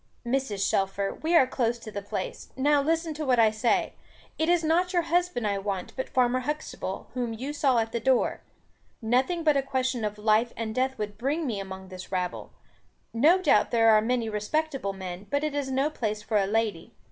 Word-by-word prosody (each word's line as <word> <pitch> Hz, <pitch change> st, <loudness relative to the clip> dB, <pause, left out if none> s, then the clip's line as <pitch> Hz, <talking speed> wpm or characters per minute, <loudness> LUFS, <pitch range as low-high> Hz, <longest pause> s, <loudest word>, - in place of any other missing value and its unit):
"Mrs. 235 Hz, -6 st, 0 dB
Shelfer, 195 Hz, 0 st, 0 dB
we 330 Hz, +2 st, +1 dB
are 300 Hz, -, +7 dB
close 240 Hz, -2 st, -1 dB
to 225 Hz, -2 st, -10 dB
the 205 Hz, -, -4 dB
place. 200 Hz, -1 st, -5 dB
Now, 290 Hz, +2 st, +3 dB
listen 325 Hz, +2 st, 0 dB
to 305 Hz, +1 st, -5 dB
what 255 Hz, -4 st, +2 dB
I 225 Hz, -2 st, +5 dB
say. 220 Hz, +2 st, +1 dB, 0.5 s
It 320 Hz, +1 st, +1 dB
is 350 Hz, -1 st, +3 dB
not 345 Hz, +4 st, +2 dB
your 350 Hz, -1 st, +2 dB
husband 350 Hz, -8 st, 0 dB
I 200 Hz, -1 st, 0 dB
want, 195 Hz, -2 st, -4 dB
but 260 Hz, -, -4 dB
Farmer 250 Hz, 0 st, +2 dB
Huxtable, 255 Hz, -8 st, -5 dB
whom 245 Hz, -2 st, -2 dB
you 260 Hz, +6 st, -5 dB
saw 275 Hz, -4 st, +2 dB
at 225 Hz, 0 st, 0 dB
the 235 Hz, -, -1 dB
door. 255 Hz, +2 st, +1 dB, 0.6 s
Nothing 260 Hz, +9 st, +1 dB
but 305 Hz, -2 st, +4 dB
a -, -, +3 dB
question 260 Hz, -3 st, -1 dB
of 210 Hz, 0 st, -2 dB
life 215 Hz, +2 st, +2 dB
and 225 Hz, -1 st, -3 dB
death 260 Hz, +2 st, 0 dB
would 210 Hz, -1 st, -5 dB
bring 295 Hz, +6 st, -1 dB
me 225 Hz, -7 st, -2 dB
among 190 Hz, -1 st, -8 dB
this 185 Hz, 0 st, -9 dB
rabble. 180 Hz, -1 st, -3 dB, 0.6 s
No 305 Hz, +11 st, +5 dB
doubt 370 Hz, -, +3 dB
there 225 Hz, -1 st, +5 dB
are 215 Hz, -1 st, +6 dB
many 235 Hz, 0 st, 0 dB
respectable 220 Hz, +1 st, -2 dB
men, 190 Hz, 0 st, -7 dB
but 285 Hz, +1 st, 0 dB
it 305 Hz, -1 st, -1 dB
is 285 Hz, -2 st, -2 dB
no 270 Hz, +3 st, +1 dB
place 215 Hz, -6 st, -3 dB
for 215 Hz, 0 st, 0 dB
a 195 Hz, -1 st, +2 dB
lady. 215 Hz, -4 st, -1 dB
240 Hz, 205 wpm, -27 LUFS, 210-285 Hz, 0.6 s, are